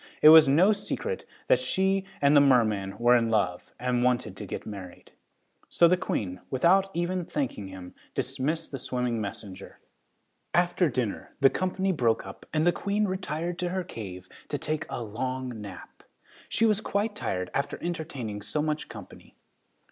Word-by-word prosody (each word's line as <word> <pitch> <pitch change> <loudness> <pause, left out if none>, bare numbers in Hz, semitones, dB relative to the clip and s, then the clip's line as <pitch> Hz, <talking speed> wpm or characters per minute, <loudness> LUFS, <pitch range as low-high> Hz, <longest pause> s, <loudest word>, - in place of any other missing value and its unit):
It 155 - +11
was 155 -2 +9
no 175 +9 +5
secret 465 - -3 0.2
that - - +4
she 190 0 +1 0.2
and 140 +1 +5
the 145 - +8
merman 110 -8 +3
were 120 +1 +5
in 115 -2 +2
love 95 -5 0
and 125 0 0
wanted 125 -1 +1
to - - -7
get - - -6
married. 95 -4 -9 0.6
So 170 - +5
the 180 - +4
Queen, 95 - -3
without 185 +9 +3
even 175 +1 -1
thanking 210 - -3
him, 95 -1 -10 0.2
dismissed 160 +5 -2
the 135 - -5
swimming 125 -2 -1
messenger. 100 -1 -7 0.8
After 175 -1 +3
dinner, 120 -5 -3
the 135 -1 +6
company 185 +1 0
broke 120 -9 +1
up - - -11
and 155 0 +1
the 175 - +5
Queen 205 +4 0
retired 175 -2 -3
to 180 - -1
her 185 +1 -2
cave 95 - -8 0.2
to 145 - -2
take 155 +2 -3
a 120 - -4
long 125 +1 -4
nap! 100 -3 -10 0.5
She 225 - +2
was 215 -1 +2
quite 205 +1 -1
tired 90 - -3
after 140 +1 -1
entertaining 145 -12 -4
so 105 +9 -2
much 155 0 -2
company. - - -12
140 Hz, 165 wpm, -27 LUFS, 110-180 Hz, 0.8 s, It